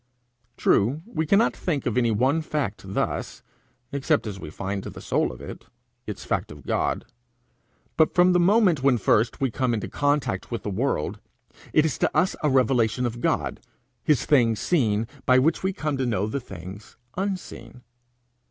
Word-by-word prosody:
True, 130 +11 +2
we 160 -9 -3
cannot 205 +7 +3
think 150 -7 -2
of 120 - -1
any 120 -2 +3
one 130 +9 +2
fact 145 -10 -3
thus, - - -2 0.5
except 140 +1 +1
as 100 -3 -5
we 80 - -7
find 95 +4 -4
the - - -8
soul - - 0
of - - -11
it - - -9 0.4
its - - -6
fact - - -2
of - - -12
God; - - -1 0.9
but 160 - +3
from 180 0 +5
the 180 - +4
moment 185 - +4
when 135 -2 +4
first 110 +2 +2
we 135 -3 0
come 125 0 0
into 105 - -3
contact 145 -9 0
with 115 - -4
the 105 - -3
world, 105 - -1 0.5
it 155 - +4
is 145 -8 -2
to - - +2
us 185 - +2
a 150 - +2
revelation 125 -2 +2
of 120 0 -4
God, - - 0 0.4
his 145 -4 +2
things 115 -7 +3
seen, 115 -10 +1 0.2
by 130 - +6
which 145 +6 +2
we 190 - 0
come 150 -7 -2
to 130 - 0
know 105 -4 0
the 110 +6 -2
things 95 -1 -10 0.2
unseen. 185 -9 -5
130 Hz, 175 wpm, -25 LUFS, 110-155 Hz, 0.9 s, by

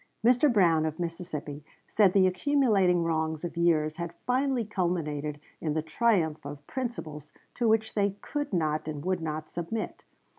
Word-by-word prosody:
Mr. 250 +4 +5
Brown, 170 -8 +4
of 155 +1 -5
Mississippi, 155 -4 -5 0.2
said 205 -3 +4
the 195 -2 +5
accumulating 195 -4 +3
wrongs 160 -1 -1
of 175 - -5
years 160 -2 +2
had 170 0 -5
finally 255 -1 +1
culminated 155 -7 -2 0.2
in 155 -2 -2
the 155 - 0
triumph 160 -5 +1
of 145 0 -8
principles 155 - -5 0.2
to 240 - 0
which 220 0 +2
they 200 -2 +1
could 290 -1 -4
not 155 -4 0
and 150 0 -5
would 185 -2 0
not 155 -1 -4
submit. 175 +6 -4
170 Hz, 155 wpm, -28 LUFS, 155-215 Hz, 0.2 s, Mr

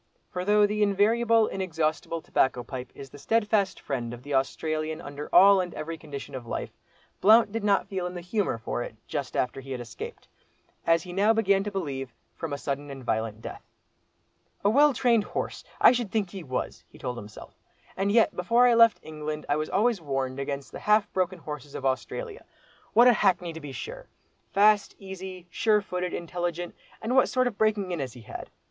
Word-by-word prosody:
For 180 - -3
though 210 +2 +5
the 210 +1 -1
invariable, 220 +3 +3
inexhaustible 165 -3 -2
tobacco 125 -2 +1
pipe 125 0 -7
is 135 -1 -10
the 145 - -12
steadfast 210 +1 +1
friend 120 -4 -4
of 120 - -15
the 145 - -5
Australian 155 +3 -1
under 145 -2 -7
all 195 0 +7
and 180 -1 -5
every 160 +2 -4
condition 145 -4 -8
of 125 -3 -7
life, - - -4 0.5
Blount 220 +1 +6
did 225 0 -3
not 200 -1 +3
feel 185 -2 -3
in 180 - -7
the 175 - -5
humour 185 - -1
for 115 +1 -3
it 110 - -6
just 135 -3 -4
after 125 +2 -1
he 135 0 -6
had 125 - -4
escaped, 120 -2 -8 0.6
as 165 0 +4
he 180 - -8
now 205 +4 +4
began 200 -3 +2
to - - -1
believe, 135 - -4 0.2
from 165 -3 -5
a 140 - -2
sudden 140 +1 -4
and 135 -2 -8
violent 110 -1 -2
death. - - -7 1.0
"A 205 - +5
well 290 +5 +6
trained 235 -4 +3
horse! - - -4 0.2
I - - +8
should 240 -4 -1
think 205 -5 -1
he 195 - -7
was," 130 -3 -4
he - - -16
told 125 -2 -4
himself; 105 -2 -10 0.4
"and 195 +1 0
yet, 230 +1 +4
before 230 +7 +3
I 240 - +5
left 230 -1 +6
England, 155 -1 -5
I 145 - +2
was 155 +1 -2
always 220 +2 +2
being 155 -4 -16
warned 135 -1 -1
against 140 0 -4
the - - -7
half 210 -1 +2
broken 185 0 0
horses 150 -3 -8
of 135 - -5
Australia. 430 - -3 0.5
What 240 +2 +7
a 245 - +8
hackney 180 -5 +1
to 160 - -8
be 145 -1 -7
sure!—fast, 215 - 0
easy, 190 -2 -8
sure 215 +1 +3
footed, 180 -1 -3
intelligent—and 175 +7 -4
what 260 - +5
sort 255 -1 +2
of 240 -5 -3
breaking 210 -4 +1
in 175 - -2
has 130 -4 -4
he 120 - -12
had? 110 - -8
180 Hz, 200 wpm, -27 LUFS, 140-210 Hz, 1.0 s, I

